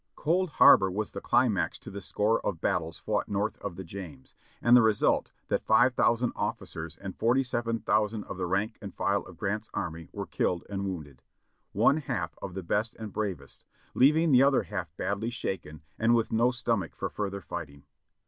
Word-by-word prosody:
Cold 180 +4 +1
Harbor 95 - +7
was 105 +3 -3
the 100 - -6
climax 100 -10 +2
to - - -11
the 100 0 -7
score 105 +4 0
of 90 -5 -2
battles 85 -3 -1
fought - - -2
north 105 +1 -1
of 100 -4 -5
the 95 - -6
James, 85 -7 -9 0.3
and 120 +1 +5
the 125 - +8
result, 110 -2 +2 0.2
that - - 0
five 120 +3 +5
thousand 120 0 +2
of^cers 80 0 -4
and 95 -1 -7
forty 120 +4 +3
seven 120 -2 -1
thousand 105 0 +1
of - - -7
the 95 - -2
rank 100 +5 -1
and 100 -2 -8
file 100 +2 +1
of - - -13
Grant's 105 +1 -3
army 80 -1 -4
were - - -5
killed 90 -1 -1
and 100 0 -2
wounded; 75 -9 -6 0.5
one 140 - +4
half 85 - -3
of 90 -2 -6
the 95 - -4
best 105 +6 -1
and 110 -3 -8
bravest, 95 -10 -4 0.3
leaving 155 +5 +4
the 130 -1 +7
other 135 -4 +4
half 90 -2 -5
badly 100 +4 -2
shaken 85 -10 -5 0.2
and 115 +1 +4
with 115 -1 0
no 115 +2 +3
stomach 115 -6 -2
for - - -4
further 100 -1 -3
fighting. 70 -2 -7
100 Hz, 190 wpm, -29 LUFS, 90-115 Hz, 0.5 s, the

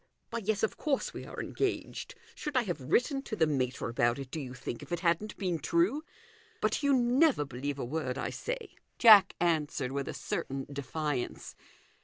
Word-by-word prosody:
" - - -46
Why, 235 - -2
yes; 215 -1 -1
of 220 - 0
course 290 -3 -1
we - - -7
are - - -7
engaged. 400 -2 -3 0.2
Should 295 -3 -3
I 250 - +4
have 175 - -3
written 255 - +1
to 230 - -5
the 165 - +4
mater 130 -4 -1
about 120 0 +2
it, 135 -2 -7
do 160 - -3
you 130 -3 -6
think, 120 - -5
if - - -11
it 175 - -1
hadn't 180 +4 0
been 180 -5 -1
true? 175 - +2 0.6
But - - +1
you 285 -1 +3
never 255 - +4
believe 140 +2 -4
a 135 - -3
word 130 -1 -2
I - - -2
say," - - -5 0.2
Jack 215 -5 +8
answered, 150 -6 0
with 140 0 -2
a - - -4
certain 135 0 -3
defiance. 140 -1 -3
165 Hz, 195 wpm, -31 LUFS, -, 0.6 s, Jack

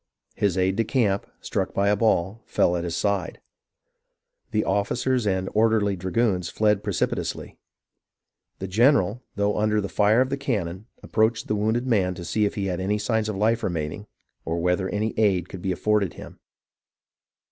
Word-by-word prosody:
His 100 -3 0
aide 95 +1 +1
de 115 - +3
camp, 105 -4 0
struck - - -2
by 100 +1 +2
a 105 - +4
ball, 105 -1 +1
fell 90 - +2
at 85 - -2
his 85 -1 -3
side. 100 -3 -1 1.1
The 105 - 0
officers 115 +4 0
and 95 -1 0
orderly 110 -2 +2
dragoons 95 -1 0
fled 105 -2 +1
precipitately. 100 -4 -2 1.0
The 95 - -5
general, 115 +1 +3
though 100 +1 0
under 105 0 +2
the 100 - -2
fire 105 +2 +3
of 130 +1 0
the 140 - 0
cannon, 105 -7 -3 0.2
approached 110 +1 +1
the 105 - 0
wounded 110 +4 0
man 95 -7 +1
to 85 - -8
see 105 +5 +1
if 100 - -2
he 100 - -2
had 90 -2 -2
any 100 +3 0
signs 110 0 0
of 105 - -3
life 110 +4 +1
remaining, 85 +1 -3 0.4
or 85 +1 -2
whether 90 +2 0
any 110 +2 -1
aid 95 -5 +2
could 95 - -8
be 95 - -1
afforded 100 0 0
him. - - -11
105 Hz, 170 wpm, -24 LUFS, 95-110 Hz, 1.1 s, a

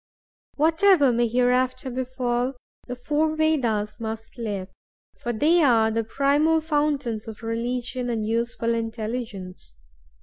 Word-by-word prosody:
Whatever 320 -1 +4
may 240 0 +2
hereafter 250 +2 +1
befall, 250 0 -1 0.3
the 250 - -4
four 300 +5 0
Vedas 235 -10 0
must 225 +2 -6
live, 200 -4 -4 0.5
for 240 - -2
they 310 +9 +3
are 230 -6 +4
the 225 +1 0
primal 285 +7 +2
fountains 290 -8 -1
of 220 0 -9
religion 245 +2 -2
and 225 -2 -1
useful 230 +1 -1
intelligence. 220 - -5
245 Hz, 115 wpm, -24 LUFS, 225-280 Hz, 0.5 s, Whatever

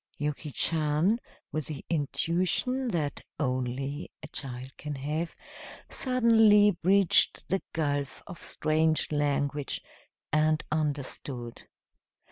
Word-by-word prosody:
Yuki 150 +1 -3
Chan, 160 - +2 0.3
with 155 -2 -3
the 150 -3 -6
intuition 175 - +1
that 160 -9 -1 0.2
only 135 +2 -2
a - - -6
child 130 -2 -6
can 150 -1 -5
have, 150 +5 -3 0.6
suddenly 225 -5 +5
bridged 190 +1 +3
the 190 +1 +1
gulf 145 -3 -2
of 175 - -10
strange 155 0 +1
language 145 -1 0 0.5
and 155 0 +3
understood. 140 -5 -3
155 Hz, 95 wpm, -29 LUFS, 140-175 Hz, 0.6 s, suddenly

